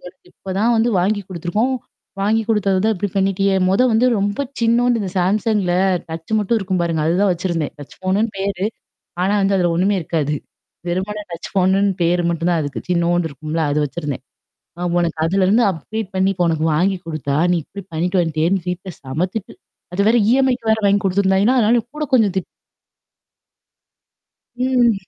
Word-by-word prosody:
உனக்கு 180 +1 -14
இப்ப 190 - -7
தான் 235 +3 +3
வந்து 225 +2 +2
வாங்கி 205 +3 +1
குடுத்துருக்கோம். 185 +8 -1 0.5
வாங்கி 215 +3 +2
குடுத்தது 200 -4 +2
தான் 220 0 +3
இப்டி 200 +1 -2
பண்ணிட்டியே? 195 0 +2
மொத 195 +6 +3
வந்து 225 +3 +3
ரொம்ப 205 +7 -1 0.2
சின்னூன்டு 235 +1 +3
இந்த 195 -3 -3
சாம்சங்ல 200 0 +1 0.4
டச் 165 +5 -7
மட்டும் 215 +2 +1
இருக்கும் 190 -3 -1
பாருங்க. 165 -2 0
அதுதான் 185 +4 +2
வச்சிருந்தேன். 170 -3 -2
டச் 145 - -12
ஃபோன்னு 190 +3 +1
பேரு. 195 0 -1 0.6
ஆனா 190 +3 +2
வந்து 195 0 +2
அதுல 175 -2 +2
ஒண்ணுமே 195 +4 +2
இருக்காது. 150 -2 -1 0.5
வெருமண 190 +4 -2
டச் 170 - -7
ஃபோன்னு 190 +1 +3 0.2
பேரு 175 +1 +2
மட்டும் 170 0 -1
தான் 170 - +2
அதுக்கு 145 -2 -4
சின்னூன்டு 175 -1 +1
இருக்கும்ல 155 +3 -3
அது 150 - +1
வச்சிருந்தேன். 145 -3 -5 0.6
ஆ - - -3
உனக்கு 170 -2 0
அதுலருந்து 195 +6 +3
அப்டேட் 200 +4 -6
பண்ணி 190 +1 +2 0.2
உனக்கு 160 -2 0
வாங்கி 190 +4 +1
குடுத்தா 155 -4 -3 0.2
நீ 175 - +2
இப்டி 200 +6 -9
பண்ணிட்டு 180 +4 0
வந்துட்டியேன்னு 165 +3 0
வீட்ல 180 +1 -5
செம்மத்திட்டு. 180 +10 -3 0.4
அது 200 +2 +1
வேற 240 - +4
இஎம்ஐக்கு 255 -3 +2
வேற 220 0 +3
வாங்கி 200 0 +3
குடுத்தருந்தாங்கேளா. 190 0 +2
ஏன்னா, 255 - +4 0.2
அதனால 240 -1 +4
கூட 305 - -2
கொஞ்சம் 220 -7 +4
திட் 190 - -1 2.1
ம். 245 -6 +1
190 Hz, 165 wpm, -19 LUFS, 170-210 Hz, 2.1 s, வேற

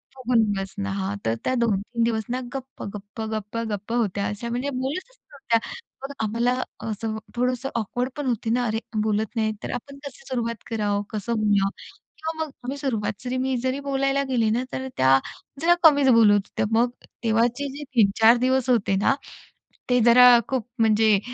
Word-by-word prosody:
फुगून 245 -3 +2
बसणं, 195 +1 -4
हां. 195 +1 -2
तर 110 - +1
त्या 255 - 0
2-3 230 +1 0
दिवस 225 -2 0
ना 250 +1 -1
गप्प, 265 0 -7
गप्प, 205 +2 -8
गप्प, 215 +1 -4
गप्प 210 +2 -4
होत्या 205 -4 0
अशा, 210 +3 -5
म्हणजे 250 +4 -2
बोलतच 285 - -4
नव्हत्या. 235 -5 0 0.4
मग 275 - -5
आम्हाला 235 +3 +1 0.4
असं 220 +1 -3
अ, - - -4 0.2
थोडंसं 250 +2 0
ऑकवर्ड 245 +3 -2
पण 290 - -3
होते 235 -2 -1
ना, 245 +2 +1
अरे 220 0 -1 0.2
बोलत 215 +1 -1
नाही. 220 -1 +1
तर - - -4
आपण 275 +3 -7
कशी 275 -1 -9
सुरुवात 235 -3 -3
करावं? 205 -3 0
कसं 215 +1 -3
बोलावं? 205 -2 +2 0.5
किंवा 320 +1 -3
मग 295 - -12
आम्ही 265 +3 -4
सुरुवात 225 -5 -3
मी 260 0 0
जरी 260 +2 0
बोलायला 275 0 0
गेले 230 -4 +2
ना 235 +3 +1
तर 265 0 -3
त्या 130 +1 +5 0.4
जरा 345 +2 +5
कमीच 285 -4 +6
बोलत 230 -4 +6
होत्या. 205 0 -1
मग 235 +2 +3 0.3
तेव्हाचे 235 +5 +1
जे 295 - -6
3-4 225 +2 +5
दिवस 260 +1 +1
होते 210 -5 +2
ना 205 - +3 0.8
ते 250 0 +4
जरा 250 +1 +8 0.2
खूप 255 -3 -2
म्हणजे 220 -2 +4
235 Hz, 175 wpm, -24 LUFS, 215-260 Hz, 0.8 s, जरा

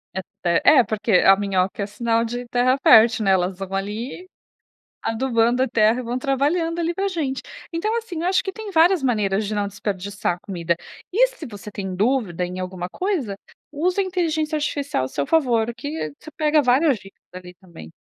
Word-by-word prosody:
É 190 - -1 0.2
ter 170 -1 +2
É. 275 -5 +7
Porque 215 +1 -3
a 195 +1 +6
minhoca 195 0 -1
é - - -1
sinal 230 +2 0
de 245 +2 -5
terra 250 +2 +2
fértil, 220 -1 +6
né? 195 - +4
Elas 185 0 +1
vão 195 0 -7
ali, 215 - -4 0.8
adubando 235 +1 +1
a 265 - +1
terra 220 +2 +3
e - - -5
vão 245 +1 -3
trabalhando 300 +6 0
ali 340 0 -1
pra 390 +2 -1
gente. 290 -8 -3 0.3
Então, 425 +7 -1
assim, 360 -8 -6
eu - - -1
acho 375 0 +2
que 385 - -4
tem 435 0 -7
várias 340 0 +4
maneiras 210 -5 0
de 215 - -3
não 205 -1 0
desperdiçar 200 -2 -3
comida. 170 -4 -1 0.4
E - - +5
se 425 - -10
você 210 -2 -9
tem 190 -2 -5
dúvida 205 -5 0
em 180 +1 -6
alguma 185 -1 -5
coisa, 315 - -2 0.4
usa 360 +6 0
a - - +1
inteligência 320 -4 -1
artificial 285 - -1
a 130 - -4
seu 140 - -3
favor, 235 -7 +2
que 285 - -4
você 310 - -12
pega 305 -1 +3
várias 265 +2 +3
dicas 195 0 -17
ali 180 -1 -10
também. 170 - -13
235 Hz, 195 wpm, -22 LUFS, 195-310 Hz, 0.8 s, É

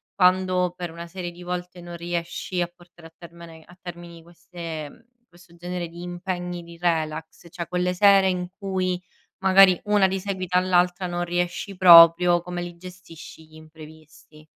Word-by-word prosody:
quando 185 -1 +2
per 175 -1 -6
una 170 +1 -9
serie 180 0 -6
di 175 +1 -13
volte 180 0 -6
non 175 0 -9
riesci 175 +1 -4
a - - -4
portare 175 -1 -18
a - - -39
termene 170 -1 -14
a 175 +2 -19
termini 175 -2 -11
queste 170 -3 -8
mhmm, - - -20 0.3
questo 175 0 -20
genere 175 0 -5
di 170 +1 -12
impegni, 175 0 -5
di 170 0 -13
relax, 160 -2 -3
cioè 170 -1 -6
quelle 180 0 -1
sere 195 +1 +5
in 180 -1 -2
cui 185 -2 -2 0.4
magari 190 -1 +6
una 210 -2 +3
di 190 0 -3
seguito 185 -2 -2
all'altra 180 0 +1
non 175 0 -3
riesci 175 +2 -3
proprio, 175 -1 +7
come 175 0 -6
li 175 0 -8
gestisci 180 -3 -13
gli 155 - -25
imprevisti? 155 0 -16
175 Hz, 165 wpm, -23 LUFS, 170-180 Hz, 0.4 s, proprio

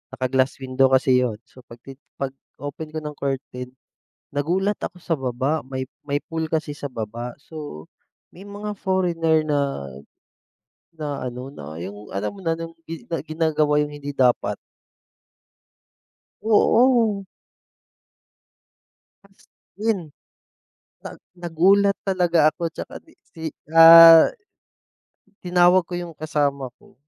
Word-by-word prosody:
naka-glass 130 +1 0
window 130 +1 +2
kasi 130 -1 +3
'yon, 120 -4 -1
so, 130 - -19
pagti 130 +4 -13 0.2
pag-open 140 +3 -7
ko - - -1
ng 150 -1 -6
curtain 135 -2 -4 0.6
nagulat 180 +8 -1
ako 180 - -6
sa 175 - -8
baba 130 +4 -1
may 130 -1 -4 0.2
may 145 +1 -1
pool 160 -1 -4
kasi 155 -1 -2
sa 145 -1 -6
baba. 120 0 -6
So, 145 - -9 0.5
may 195 +3 -13
mga 205 0 -7
foreigner 165 -4 +1
na 150 -2 0 1.3
na 145 -4 -5
ano, 125 +1 -6
na 80 - -9
yung, 105 +3 -9
alam 100 +2 -2
mo - - -11
na, 165 - +1
nung 165 0 -6
gi 165 0 -9 0.2
ginagawa 155 -2 +1
yung 150 0 -2
hindi 145 0 -6
dapat. 125 -3 +1 1.9
Oo. 225 -1 +3 2.0
As 195 - -27 0.5
in, 200 - -2 1.0
nag - - -9 0.2
nagulat 195 +4 +3
talaga 180 -3 +1
ako 170 - -18
tsaka 275 - -8
di 320 - -21 0.2
si 160 -2 -12 0.3
ah 165 0 +10 1.1
Tinawag 180 +1 +4
ko - - -7
yung 175 -2 -6
kasama 145 -4 -2
ko, - - -22
155 Hz, 120 wpm, -22 LUFS, 130-175 Hz, 2.0 s, ah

